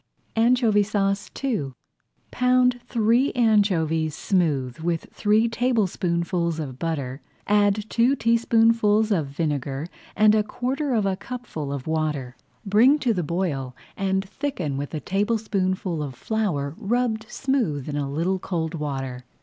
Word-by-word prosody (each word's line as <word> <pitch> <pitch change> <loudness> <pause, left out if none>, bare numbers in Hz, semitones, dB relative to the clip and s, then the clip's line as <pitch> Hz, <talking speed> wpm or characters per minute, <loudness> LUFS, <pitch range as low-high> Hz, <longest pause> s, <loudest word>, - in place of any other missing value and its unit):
ANCHOVY 230 -2 +4
SAUCE 200 -1 0
II 200 - -1 0.6
Pound 250 -1 +3
three 235 +3 +2
anchovies 180 - +2
smooth 150 - 0
with 165 0 -1
three 215 +2 +3
tablespoonfuls 180 -8 0
of 135 -4 -6
butter, 145 -5 -3 0.2
add 205 0 +2
two 240 +5 +3
teaspoonfuls 225 -2 +3
of 165 -8 +1
vinegar 140 -1 -2 0.3
and 215 0 +5
a 215 - +4
quarter 265 +6 -2
of 215 -3 +1
a 195 -1 +1
cupful 190 - -6
of 140 -2 -4
water. 150 -5 -2 0.3
Bring 230 +9 +5
to 250 -6 +1
the 180 - -1
boil 150 -6 -2 0.2
and 190 0 -1
thicken 190 - -3
with 140 +1 -4
a - - -2
tablespoonful 195 -4 -1
of 140 -4 -5
flour 150 - -2
rubbed 225 0 -1
smooth 230 - -1
in 150 - -3
a 145 -1 -2
little 170 +6 0
cold 165 -3 -3
water. 135 -5 -4
195 Hz, 135 wpm, -24 LUFS, 155-225 Hz, 0.6 s, and